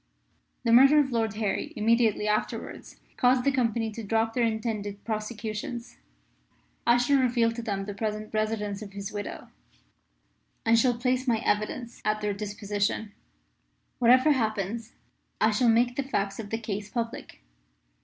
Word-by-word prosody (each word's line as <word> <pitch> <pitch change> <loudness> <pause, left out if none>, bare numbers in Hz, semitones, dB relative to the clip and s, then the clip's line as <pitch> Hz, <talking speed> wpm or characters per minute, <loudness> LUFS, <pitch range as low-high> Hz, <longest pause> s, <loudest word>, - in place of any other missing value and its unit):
"The 230 - +1
murder 270 +5 +8
of 285 -3 +3
Lord 225 -3 0
Harry 210 -2 -2
immediately 220 -1 +2
afterwards 210 0 -3 0.2
caused 250 0 +4
the 280 - +3
Company 230 -3 0
to 230 - -7
drop 225 +2 0
their 245 - +1
intended 220 -3 -2
prosecution. 215 +1 -4 1.1
I 235 +1 +6
shall 270 +3 +3
reveal 240 -3 +2
to 235 +1 -5
them 200 -4 -3
the 205 - -5
present 215 +1 -4
residence 215 -2 -1
of 200 -2 -9
his 200 0 -6
widow, 205 -1 -6 1.2
and 230 0 +5
shall 245 0 +2
place 255 +1 0
my 235 -2 +3
evidence 225 +3 -1
at 215 0 0
their 210 -1 -1
disposition. 205 +1 -2 0.9
Whatever 255 +5 +6
happens 220 -2 -1 0.5
I 220 - +4
shall 235 +3 +3
make 240 +2 +3
the 280 - 0
facts 200 -7 -2
of 210 -2 -6
the 225 - -1
case 210 -2 -5
public. 230 - -5
225 Hz, 150 wpm, -27 LUFS, 210-240 Hz, 1.2 s, murder